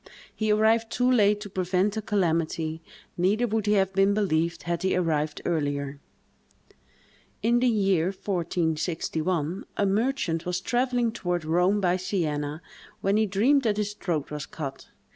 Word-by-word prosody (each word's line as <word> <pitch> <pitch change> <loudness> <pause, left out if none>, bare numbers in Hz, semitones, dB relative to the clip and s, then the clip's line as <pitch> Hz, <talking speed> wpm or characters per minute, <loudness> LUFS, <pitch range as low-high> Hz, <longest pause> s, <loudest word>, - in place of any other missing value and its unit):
He 215 -1 0
arrived 225 +2 +3
too 250 +1 +2
late 210 -4 +3
to 205 - -7
prevent 185 +2 0
the 220 - -3
calamity; 165 -5 -1 0.4
neither 200 +7 +2
would 220 -2 -1
he 210 - +4
have 195 -2 +2
been 195 +1 +3
believed, 170 -5 0
had 170 -1 -2
he 190 +1 +1
arrived 155 -4 -1
earlier. 145 -3 -1 1.4
In 235 +2 +3
the 250 - +2
year 195 -7 +2
1461, 170 -2 -1
a 205 - +2
merchant 200 - 0
was 180 0 -2
travelling 245 +2 0
toward 175 -6 -2
Rome 180 +5 +2
by 180 -2 +2
Sienna, 155 -5 -2 0.4
when 195 +1 +2
he 215 0 +3
dreamed 235 +9 +3
that 215 -5 0
his 210 -1 -1
throat 170 -9 -3
was 150 -1 -5
cut. 135 -4 -7
190 Hz, 150 wpm, -26 LUFS, 165-210 Hz, 1.4 s, he